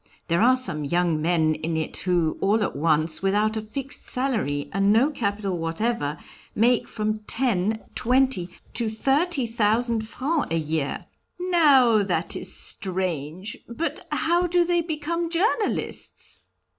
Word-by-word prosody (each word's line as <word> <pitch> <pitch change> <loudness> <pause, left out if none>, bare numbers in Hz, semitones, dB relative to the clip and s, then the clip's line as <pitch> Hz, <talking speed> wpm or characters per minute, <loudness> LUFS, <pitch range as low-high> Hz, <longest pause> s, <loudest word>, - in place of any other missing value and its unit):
There 170 +3 +2
are 255 +3 +5
some 155 -13 +1
young 170 +1 +1
men 160 -1 +2
in 160 +1 -3
it 160 - -3
who, 175 -4 0
all 210 +2 +2
at - - -3
once, 155 +1 +1
without 210 +3 +1
a 220 - -2
fixed 260 +5 -5
salary, 220 - -1
and 195 +1 +3
no 245 +8 +4
capital 200 - -2
whatever, 165 -2 -1 0.4
make 235 +2 +3
from 215 -1 -2
ten, 220 -4 +1
twenty 255 -7 +1 0.2
to 230 -2 0
thirty 275 +6 +1
thousand 230 0 0
francs 285 +7 -1
a 165 - 0
year." 155 -2 -2 0.3
"Now, 285 - +5
that 175 -4 -2
is - - -4
strange! 185 -1 -1
But 275 +8 -4
how 345 +2 +1
do 350 0 +2
they 345 0 +2
become 335 +1 -3
journalists?" 405 +6 -1
215 Hz, 140 wpm, -24 LUFS, 175-265 Hz, 0.4 s, are